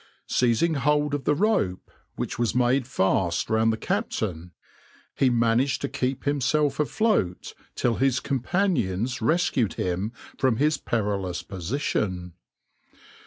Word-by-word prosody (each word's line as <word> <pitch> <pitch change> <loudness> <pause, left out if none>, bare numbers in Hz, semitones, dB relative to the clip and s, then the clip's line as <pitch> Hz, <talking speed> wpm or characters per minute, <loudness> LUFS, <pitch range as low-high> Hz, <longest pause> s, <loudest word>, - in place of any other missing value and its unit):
Seizing 125 +7 +2
hold 150 +1 +1
of 145 -2 -2
the 150 - +3
rope 145 - 0 0.2
which - - -4
was 120 -1 0
made 125 +1 +2
fast 95 -7 0
round 110 0 +3
the 110 - -2
captain, 90 -6 -3 0.6
he 135 - +3
managed 120 +2 +2
to - - -1
keep 135 0 -2
himself 145 +1 +1
afloat 150 - 0 0.2
till 120 -2 0
his 130 -1 +2
companions 130 - -1
rescued 135 - +1
him 95 +4 -2 0.3
from 130 -4 +3
his 150 +2 +2
perilous 100 -8 -2
position. 95 - -3
125 Hz, 120 wpm, -25 LUFS, 100-140 Hz, 0.6 s, the